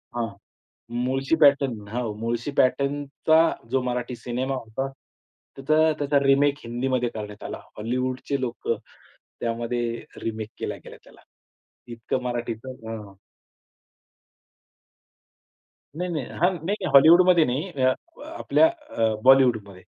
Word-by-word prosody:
हां, 120 Hz, -1 st, -1 dB, 0.8 s
मुळशी 135 Hz, +4 st, +1 dB
पॅटर्न 135 Hz, -8 st, +3 dB
हो. 115 Hz, 0 st, -3 dB
मुळशी 115 Hz, +4 st, -2 dB
पॅटर्नचा 145 Hz, +4 st, +2 dB, 0.2 s
जो 130 Hz, 0 st, +1 dB
मराठी 125 Hz, 0 st, -3 dB
सिनेमा 125 Hz, +3 st, -3 dB
होता. 130 Hz, +2 st, -4 dB, 0.7 s
त्याचा 155 Hz, +3 st, +3 dB
त्याचा 145 Hz, 0 st, +2 dB
रिमेक 140 Hz, +1 st, +4 dB
हिंदीमध्ये 125 Hz, +1 st, -1 dB
करण्यात 105 Hz, -1 st, -7 dB
आला. -, -, -5 dB, 0.2 s
हॉलिवूडचे 130 Hz, +4 st, -2 dB
लोकं 125 Hz, -2 st, -2 dB, 0.6 s
त्यामध्ये 120 Hz, 0 st, -2 dB, 0.2 s
रिमेक 110 Hz, -1 st, -4 dB
केल्या -, -, -3 dB
गेल्या -, -, -11 dB
त्याला. -, -, -18 dB, 0.7 s
इतकं 115 Hz, +2 st, -3 dB
मराठीचं 120 Hz, 0 st, -4 dB, 0.2 s
हं, 115 Hz, -, -4 dB
हं. 95 Hz, -, -16 dB, 2.8 s
नाही, 180 Hz, +2 st, -3 dB
नाही. 155 Hz, -5 st, -2 dB, 0.2 s
हां, 180 Hz, -, +5 dB, 0.2 s
नाही 200 Hz, -1 st, -1 dB
हॉलिवूडमध्ये 170 Hz, +4 st, +7 dB
नाही 135 Hz, +9 st, -2 dB
अ, 130 Hz, 0 st, +5 dB, 0.3 s
आपल्या 320 Hz, -, +3 dB, 0.2 s
अ, 110 Hz, -1 st, +1 dB
बॉलिवूडमध्ये. 120 Hz, -8 st, +4 dB
130 Hz, 110 wpm, -25 LUFS, 115-140 Hz, 2.8 s, हॉलिवूडमध्ये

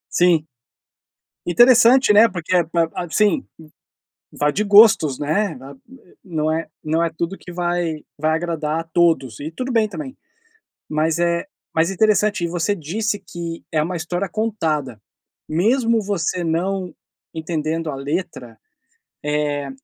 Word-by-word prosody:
Sim. 170 Hz, -3 st, +3 dB, 1.0 s
Interessante, 240 Hz, +4 st, +6 dB
né. 220 Hz, +3 st, +7 dB
Porque 180 Hz, -3 st, -4 dB, 0.2 s
ba 170 Hz, -1 st, +2 dB
ab 175 Hz, -3 st, -5 dB
sim, 215 Hz, +7 st, +2 dB, 0.9 s
vai 150 Hz, 0 st, 0 dB
de 210 Hz, -, 0 dB
gostos, 200 Hz, -, +6 dB
né. 170 Hz, +7 st, -1 dB
A 135 Hz, +2 st, -11 dB
b 135 Hz, -, -24 dB, 0.4 s
não 155 Hz, -4 st, -1 dB
é 165 Hz, 0 st, -3 dB, 0.2 s
não 160 Hz, +2 st, +1 dB
é 170 Hz, -, 0 dB
tudo 170 Hz, +4 st, -4 dB
que 180 Hz, -, -11 dB
vai 175 Hz, -3 st, -2 dB, 0.2 s
vai 155 Hz, +1 st, +1 dB
agradar 160 Hz, -2 st, -2 dB
a -, -, -7 dB
todos, 160 Hz, -9 st, +1 dB
e 150 Hz, +2 st, -5 dB
tudo 255 Hz, +10 st, -4 dB
bem 225 Hz, -2 st, +2 dB
também. 265 Hz, +4 st, -7 dB, 0.7 s
Mas 155 Hz, +2 st, 0 dB
é 170 Hz, +3 st, 0 dB, 0.3 s
mas 165 Hz, +1 st, +2 dB
interessante. 210 Hz, -1 st, +2 dB
E -, -, +1 dB
você 175 Hz, +4 st, -1 dB
disse 205 Hz, +6 st, -2 dB
que 170 Hz, -3 st, -7 dB
é 155 Hz, -1 st, +1 dB
uma 180 Hz, +4 st, -3 dB
história 175 Hz, +3 st, -3 dB
contada, 160 Hz, -, -2 dB, 0.5 s
mesmo 225 Hz, -, +2 dB
você 185 Hz, -3 st, -2 dB
não 180 Hz, +2 st, -2 dB, 0.4 s
entendendo 160 Hz, 0 st, -3 dB
a 140 Hz, -, -4 dB
letra, 135 Hz, -5 st, -5 dB, 0.6 s
eh, 150 Hz, -1 st, -1 dB
170 Hz, 140 wpm, -20 LUFS, 155-200 Hz, 1.0 s, né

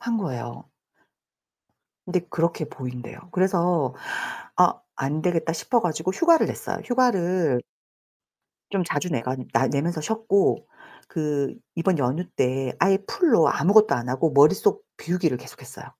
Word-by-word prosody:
한 235 Hz, -1 st, -1 dB
거예요. 120 Hz, -, -5 dB, 1.4 s
근데 180 Hz, 0 st, 0 dB
그렇게 165 Hz, -1 st, -1 dB
보인대요. 125 Hz, -3 st, -8 dB
그래서 175 Hz, -7 st, +1 dB, 0.6 s
아 -, -, +5 dB, 0.2 s
안되겠다 160 Hz, +4 st, -1 dB
싶어 235 Hz, +8 st, 0 dB
가지고 175 Hz, +1 st, -1 dB
휴가를 335 Hz, -, +4 dB
냈어요. -, -, -4 dB
휴가를 185 Hz, -, +1 dB, 1.1 s
좀 195 Hz, -2 st, 0 dB
자주 165 Hz, +1 st, -2 dB
내간 130 Hz, -1 st, -3 dB
나 135 Hz, -, +3 dB
내면서 155 Hz, +3 st, -1 dB
쉬었고 220 Hz, +1 st, +1 dB, 0.4 s
그 150 Hz, -4 st, -2 dB, 0.2 s
이번 170 Hz, +1 st, +1 dB
연휴 140 Hz, +7 st, 0 dB
때 130 Hz, 0 st, 0 dB
아예 195 Hz, 0 st, +4 dB
full로 325 Hz, -, +4 dB
아무것도 210 Hz, +8 st, +4 dB
안 120 Hz, +1 st, -4 dB
하고 140 Hz, +5 st, +1 dB
머릿속 405 Hz, -, +4 dB
비우기를 170 Hz, -6 st, -1 dB
계속했어요. -, -, -12 dB
165 Hz, 295 characters per minute, -24 LUFS, 140-190 Hz, 1.4 s, 아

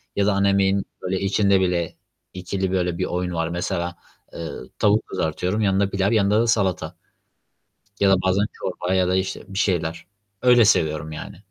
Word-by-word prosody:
ya 100 Hz, -, +2 dB
da 105 Hz, -, +3 dB
ana 100 Hz, 0 st, +2 dB
yemeğin 100 Hz, 0 st, +2 dB, 0.2 s
böyle 95 Hz, +1 st, -2 dB
içinde 100 Hz, 0 st, +3 dB
bile 90 Hz, -2 st, -1 dB, 0.4 s
2'li 95 Hz, +1 st, -3 dB
böyle 90 Hz, -2 st, 0 dB
bir -, -, -1 dB
oyun 90 Hz, 0 st, -2 dB
var. 80 Hz, 0 st, -1 dB
Mesela, 85 Hz, 0 st, -3 dB, 0.4 s
eee, -, -, -8 dB, 0.4 s
tavuk 105 Hz, +1 st, +3 dB
kızartıyorum, 90 Hz, +7 st, -2 dB
yanında 100 Hz, 0 st, +2 dB
pilav, 100 Hz, +1 st, 0 dB
yanında 105 Hz, 0 st, +3 dB
da 120 Hz, -, +1 dB
salata. 100 Hz, -5 st, 0 dB, 1.1 s
Ya 100 Hz, -1 st, +5 dB
da 95 Hz, -1 st, +3 dB
bazen 95 Hz, +2 st, +2 dB
çorba 90 Hz, 0 st, -3 dB
ya 90 Hz, -1 st, +2 dB
da 90 Hz, -, +1 dB
işte 95 Hz, 0 st, -2 dB
bir 95 Hz, 0 st, -5 dB
şeyler. 85 Hz, -5 st, -1 dB, 0.4 s
Öyle 125 Hz, -2 st, +6 dB
seviyorum 80 Hz, -4 st, +1 dB
yani. 75 Hz, -, -8 dB
95 Hz, 170 wpm, -23 LUFS, 90-100 Hz, 1.1 s, Öyle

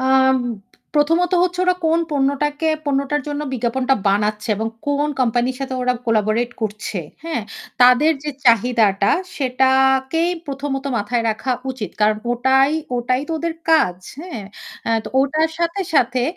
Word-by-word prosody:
আম 265 Hz, 0 st, +4 dB, 0.6 s
প্রথমত 330 Hz, +4 st, +2 dB
হচ্ছে 360 Hz, 0 st, 0 dB
ওরা 365 Hz, 0 st, +3 dB
কোন 330 Hz, +1 st, +3 dB
পণ্যটাকে 290 Hz, +2 st, 0 dB, 0.2 s
পণ্যটার 280 Hz, +1 st, 0 dB
জন্য 290 Hz, 0 st, -3 dB
বিজ্ঞাপনটা 255 Hz, +2 st, 0 dB
বানাচ্ছে 210 Hz, +2 st, 0 dB
এবং 220 Hz, +2 st, -2 dB, 0.2 s
কোন 285 Hz, +1 st, +1 dB
কোম্পানির 245 Hz, +1 st, +1 dB
সাথে 265 Hz, -1 st, -3 dB
ওরা 250 Hz, 0 st, +2 dB
collaborate 225 Hz, +2 st, +1 dB
করছে, 210 Hz, -2 st, -3 dB, 0.2 s
হ্যাঁ? 325 Hz, -8 st, -2 dB, 0.4 s
তাদের 250 Hz, +6 st, +6 dB
যে 300 Hz, -, -2 dB
চাহিদাটা 225 Hz, -4 st, +3 dB, 0.3 s
সেটাকেই 265 Hz, +4 st, +2 dB, 0.2 s
প্রথমত 275 Hz, -1 st, -4 dB
মাথায় 230 Hz, +2 st, -1 dB
রাখা 255 Hz, +4 st, -2 dB, 0.2 s
উচিত। 245 Hz, -6 st, -5 dB
কারণ 210 Hz, 0 st, +3 dB, 0.2 s
ওটাই 265 Hz, +3 st, +3 dB, 0.3 s
ওটাই 250 Hz, +1 st, 0 dB
তো -, -, -2 dB
ওদের 335 Hz, 0 st, -2 dB, 0.2 s
কাজ, 310 Hz, -, +4 dB, 0.2 s
হ্যাঁ? 330 Hz, -, -7 dB, 0.5 s
এ -, -, +1 dB
তো -, -, -5 dB
ওটার 310 Hz, +4 st, +1 dB
সাথে, 340 Hz, +3 st, -1 dB
সাথে 250 Hz, -2 st, +2 dB
265 Hz, 140 wpm, -20 LUFS, 235-295 Hz, 0.6 s, তাদের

